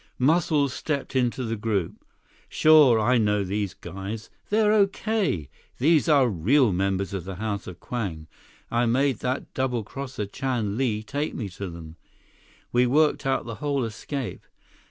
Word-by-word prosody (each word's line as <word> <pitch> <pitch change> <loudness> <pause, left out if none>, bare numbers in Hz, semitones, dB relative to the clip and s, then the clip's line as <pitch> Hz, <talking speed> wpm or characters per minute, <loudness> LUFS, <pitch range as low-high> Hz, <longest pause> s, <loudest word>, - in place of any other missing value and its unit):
176 130 +3 +3
Muscles 150 -6 +1
stepped 145 -3 -3
into 125 0 +1
the 115 -1 -2
group. 105 -5 -2 0.5
"Sure, 150 -7 +6
I 120 +3 +3
know 105 -2 +2
these 100 0 -2
guys. 100 +3 -7 0.2
They're 210 0 +3
okay. 200 - +1 0.3
These 155 +4 +3
are 140 -4 +5
real 110 - +3
members 95 +1 -1
of 95 -3 -3
the 95 +1 -6
House 100 +1 -4
of 90 - -9
Kwang. 95 -11 -4 0.5
I 120 0 +2
made 130 0 +2
that 130 +1 -3
double 125 -4 -1
crosser 130 0 -5
Chan 115 -2 -2
Li 110 -4 0
take 145 +7 -3
me 105 -6 -4
to 95 +1 -6
them. 85 -1 -10 0.7
We 125 +1 +3
worked 150 +1 +2
out 135 - 0
the 115 -2 -6
whole 140 -3 0
escape. 115 0 -5
120 Hz, 155 wpm, -25 LUFS, 100-140 Hz, 0.7 s, Sure